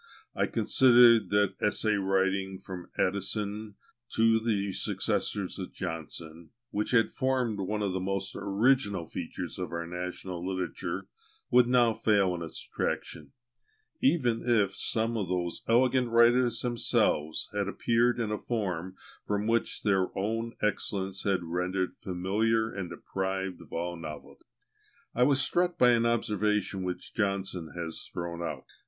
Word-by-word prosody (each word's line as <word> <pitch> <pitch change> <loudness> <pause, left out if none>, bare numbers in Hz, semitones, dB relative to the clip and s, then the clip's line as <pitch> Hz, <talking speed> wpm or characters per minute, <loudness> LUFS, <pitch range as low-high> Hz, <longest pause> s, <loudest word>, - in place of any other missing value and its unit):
I - - +1
considered 120 -5 +5
that 100 -1 +2
essay 105 +1 +1
writing, 95 -1 0
from 90 -2 -9
Addison 100 +2 -1 0.4
to 115 0 +4
the 105 -3 0
successors - - -1
of - - -6
Johnson, 80 0 -6 0.2
which 105 +1 -1
had 115 -3 +3
formed 130 -5 0
one 105 +2 -2
of 100 - 0
the 95 - -1
most 95 +1 -3
original 100 -3 +1
features - - -6
of - - -4
our 85 0 -3
national 90 0 -5
literature, 95 -1 -3 0.4
would 125 -1 +6
now 120 -2 +4
fail 100 -4 +2
in 85 - -5
its 80 - -6
attraction, 75 - -3 0.7
even 125 - +2
if 105 -5 +2
some 115 +3 0
of 100 -4 -2
those 90 -2 -2
elegant 125 +1 +3
writers 120 +1 +4
themselves 90 -10 +1
had - - -1
appeared 120 +1 +1
in 110 -2 -1
a 105 - -2
form 95 -6 -3 0.3
which 105 +3 0
their 95 -3 +2
own 115 +3 -2
excellence 95 -2 -1
had 95 -3 +1
rendered 90 +2 -2
familiar 110 +5 0
and 95 -3 -4
deprived 95 -1 -3
of - - -15
all 85 +1 -3
novelty. 75 -3 -9 0.7
I 125 - -1
was 135 +1 +5
struck 175 +2 +1
by 125 -1 +6
an 115 -1 +3
observation 105 -3 0
which 90 -1 -5
Johnson 95 -5 -2
has 85 -2 -6
thrown 85 0 -5
out. 75 -6 -4
100 Hz, 140 wpm, -29 LUFS, 90-115 Hz, 0.7 s, would